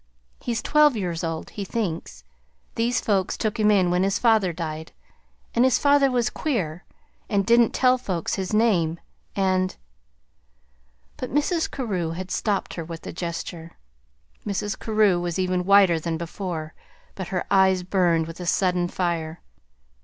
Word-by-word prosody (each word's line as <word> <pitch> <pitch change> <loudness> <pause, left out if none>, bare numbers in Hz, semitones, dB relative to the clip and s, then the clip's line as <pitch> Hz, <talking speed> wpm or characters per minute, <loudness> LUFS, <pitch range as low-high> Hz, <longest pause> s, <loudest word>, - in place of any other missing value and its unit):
He's 235 -1 -3
twelve 300 -4 +4
years 175 -4 -3
old, 165 -1 -4
he 205 - -5
thinks. 165 - -4 0.5
These 235 +1 +1
folks 195 -3 0
took 220 0 -2
him 210 0 +4
in 190 -4 +3
when 180 0 +2
his 195 +1 +1
father 220 -6 +3
died, 160 -1 -6 0.6
and 235 - +3
his 260 -1 +4
father 285 -1 +4
was 245 -2 0
queer, 185 - -2 0.4
and 200 -2 +1
didn't 235 -1 +5
tell 255 0 +4
folks 185 -9 -3
his 190 -1 -2
name, 185 -7 +2 0.4
and 185 -1 +1 0.7
" 60 0 -39
But 255 - -5
Mrs. 320 +4 +1
Carew 185 - -2
had 185 +2 -6
stopped 205 -3 -1
her 170 - -5
with 165 0 -9
a - - -6
gesture. 170 -1 -6 0.7
Mrs. 205 0 -3
Carew 215 -5 +2
was 175 -1 -3
even 185 -1 0
whiter 195 -4 +5
than 165 0 -3
before, 170 -2 -5 0.4
but 190 -3 -6
her 185 -1 -2
eyes 190 -1 +4
burned 175 -3 +2
with 165 +2 -9
a 180 - -5
sudden 180 0 +1
fire. 170 -3 -3
185 Hz, 155 wpm, -24 LUFS, 170-215 Hz, 0.7 s, didn't